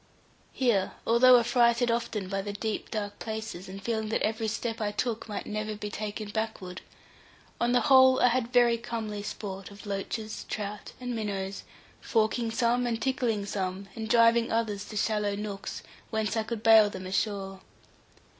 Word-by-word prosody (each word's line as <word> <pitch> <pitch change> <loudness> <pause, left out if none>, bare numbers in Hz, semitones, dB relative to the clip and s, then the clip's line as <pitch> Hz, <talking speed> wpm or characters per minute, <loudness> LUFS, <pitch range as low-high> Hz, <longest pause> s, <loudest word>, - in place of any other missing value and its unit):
Here, 235 -8 +1
although 245 +2 +7
affrighted 235 0 +3
often 230 -4 -2
by 195 +1 -2
the 205 +1 -5
deep, 215 +1 -3
dark 205 -2 -4
places, 220 -4 -5
and 195 +1 -7
feeling 220 +1 -2
that 220 - 0
every 220 +1 0
step 225 +1 -3
I 205 -1 0
took 225 +1 -2
might 205 - -4
never 215 0 -3
be 210 0 -6
taken 210 0 -5
backward, 205 -4 -4 0.8
on 240 0 +2
the 245 - +4
whole 260 -2 +6
I 250 - +5
had 240 0 0
very 240 -2 +4
comely 220 -3 -4
sport 195 -2 -6
of 200 +1 -12
loaches, 210 +2 -4
trout, 210 0 -5
and 250 -1 -4
minnows, 200 -3 -3 0.4
forking 225 +1 +1
some, 245 +1 +1
and 230 -1 -1
tickling 245 -7 0
some, 195 -1 -3
and 220 -1 -5
driving 230 0 +5
others 220 -3 -1
to 215 - -7
shallow 210 -1 0
nooks, 200 -1 -5 0.3
whence 220 -1 -1
I 225 - +2
could 225 0 -5
bail 220 -2 +7
them 185 -2 -7
ashore. 195 0 -2
220 Hz, 165 wpm, -28 LUFS, 205-235 Hz, 0.8 s, although